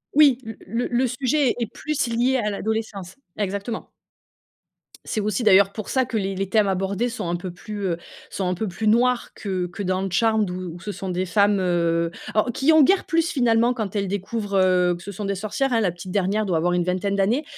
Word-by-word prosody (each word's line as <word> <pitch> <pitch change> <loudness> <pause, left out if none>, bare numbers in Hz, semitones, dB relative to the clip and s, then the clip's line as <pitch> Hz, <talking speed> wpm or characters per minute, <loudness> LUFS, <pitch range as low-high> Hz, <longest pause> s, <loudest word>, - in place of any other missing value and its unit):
Oui, 285 -5 +6
l 225 -1 -7
le 230 +5 -1
le 250 +2 +2
sujet 255 +2 +1
est 235 - 0
plus 300 +5 -3
lié 245 +3 +1
à 210 -3 0
l'adolescence. 205 -3 -4 0.2
Exactement 200 +3 -3 1.2
c'est - - -2
aussi 210 +3 -1
d'ailleurs 200 -1 +5
pour 215 -3 -6
ça 260 -1 +2
que 235 - -6
les 195 -1 -1
les 195 +1 -2
thèmes 215 -2 +3
abordés 195 +5 -1
sont 230 -7 -5
un 175 - 0
peu 175 +1 -5
plus, 205 +3 -8
heu, 170 - -1 0.3
sont 190 - -3
un 180 - +1
peu 210 +4 -3
plus 215 +5 -3
noirs 245 +2 +2
que 185 -3 -3
que 195 +3 -6
dans 185 +1 -1
Charmed 220 +2 +2
où 180 -2 -5
où - - -10
ce 205 - -5
sont 190 -1 -6
des 180 +1 -1
femmes, 200 +2 +3
heu, 170 -2 +1 0.2
alors 220 +3 +2
qui 275 +7 +3
ont 315 -1 +7
guère 380 +7 +4
plus 330 0 +1
finalement 240 -2 +3
quand 215 -4 -4
elles 200 -1 0
découvrent, 200 +2 -3
heu, 180 -2 +3
que 175 - -11
ce 200 - -6
sont 205 +2 -5
des 200 0 -1
sorcières. 215 +7 -1
Hein, 225 - +3
la 185 - +1
petite 175 +2 -9
dernière 200 +2 +1
doit 180 - 0
avoir 175 +2 +1
une 175 -1 +1
vingtaine 185 +2 -1
d'années. 220 +9 +2
205 Hz, 225 wpm, -23 LUFS, 185-235 Hz, 1.2 s, ont